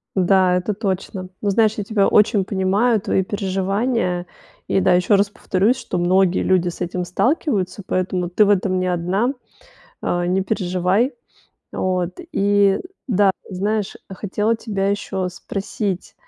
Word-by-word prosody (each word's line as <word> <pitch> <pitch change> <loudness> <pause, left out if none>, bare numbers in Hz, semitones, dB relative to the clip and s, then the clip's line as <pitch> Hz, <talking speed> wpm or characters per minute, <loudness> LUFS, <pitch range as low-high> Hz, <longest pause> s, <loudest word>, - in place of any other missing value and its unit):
Да, 185 -1 +3
это 180 +4 -1
точно. 190 -2 -3
Но 205 - 0
знаешь, 220 +1 +3
я 205 - -2
тебя 200 -2 +2
очень 210 -1 +4
понимаю, 200 +5 +1
твои 195 -2 +1
переживания. 195 0 -1 0.4
И - - +2
да, 180 - +3
ещё 180 +3 +3
раз 200 +1 +2
повторюсь, 205 +5 0
что 230 -7 -4
многие 185 +1 +2
люди 180 -1 +2
с 175 - -9
этим 180 0 -2
сталкиваются, 205 - 0
поэтому 185 -1 -1
ты 210 +4 +4
в 205 - +1
этом 185 -2 +2
не 185 - -1
1, 185 +9 0 0.7
э, 175 0 0
не 185 +2 +1
переживай. 185 +5 0 0.6
Вот. 180 -1 -2
И 200 -1 +3 0.3
да, 200 -3 +4 0.2
знаешь, 205 +2 -2
хотела 210 +3 -1
тебя 200 -4 -2
ещё 195 -2 -2
спросить. 195 +1 -4
195 Hz, 145 wpm, -20 LUFS, 185-210 Hz, 0.7 s, очень